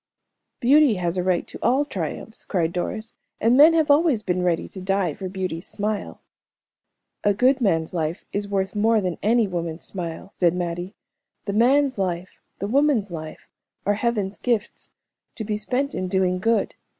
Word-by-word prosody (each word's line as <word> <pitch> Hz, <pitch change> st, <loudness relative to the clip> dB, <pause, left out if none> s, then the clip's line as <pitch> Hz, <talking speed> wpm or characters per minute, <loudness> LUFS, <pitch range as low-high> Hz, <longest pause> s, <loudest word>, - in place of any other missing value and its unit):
"Beauty 280 Hz, -1 st, +5 dB
has 175 Hz, -1 st, -1 dB
a 180 Hz, -, 0 dB
right 180 Hz, -1 st, +1 dB
to -, -, -11 dB
all 265 Hz, +4 st, +2 dB
triumphs," 200 Hz, -, -5 dB
cried 170 Hz, -4 st, -1 dB
Doris, 215 Hz, +5 st, -4 dB, 0.3 s
"and 230 Hz, +3 st, +3 dB
men 305 Hz, +5 st, +8 dB
have 315 Hz, -3 st, +3 dB
always 285 Hz, -7 st, +3 dB
been 180 Hz, -2 st, 0 dB
ready 175 Hz, -2 st, 0 dB
to 190 Hz, -, -9 dB
die 190 Hz, -3 st, 0 dB
for 185 Hz, +5 st, -6 dB
beauty's 185 Hz, -3 st, -4 dB
smile." 210 Hz, 0 st, -3 dB, 1.0 s
"A 205 Hz, -1 st, +3 dB
good 260 Hz, +5 st, +3 dB
man's 165 Hz, -7 st, +1 dB
life 165 Hz, 0 st, -2 dB
is 205 Hz, 0 st, -2 dB
worth 195 Hz, -1 st, -1 dB
more 220 Hz, +2 st, +3 dB
than 180 Hz, -4 st, -3 dB
any 225 Hz, +1 st, +3 dB
woman's 170 Hz, -2 st, -4 dB
smile," 175 Hz, 0 st, -6 dB
said 175 Hz, -1 st, +2 dB
Mattie. 175 Hz, +2 st, -4 dB, 0.5 s
"The 200 Hz, -, -2 dB
man's 260 Hz, +3 st, +3 dB
life, 180 Hz, -1 st, -3 dB, 0.2 s
the -, -, -3 dB
woman's 260 Hz, -5 st, +2 dB
life, 155 Hz, -2 st, -8 dB, 0.4 s
are 205 Hz, -, +3 dB
Heaven's 210 Hz, -3 st, -1 dB
gifts, 235 Hz, -3 st, -2 dB, 0.5 s
to 220 Hz, -, -4 dB
be 210 Hz, 0 st, -2 dB
spent 255 Hz, +7 st, -1 dB
in 185 Hz, -, -2 dB
doing 185 Hz, -1 st, +1 dB
good. 225 Hz, +3 st, +1 dB
200 Hz, 170 wpm, -23 LUFS, 180-235 Hz, 1.0 s, men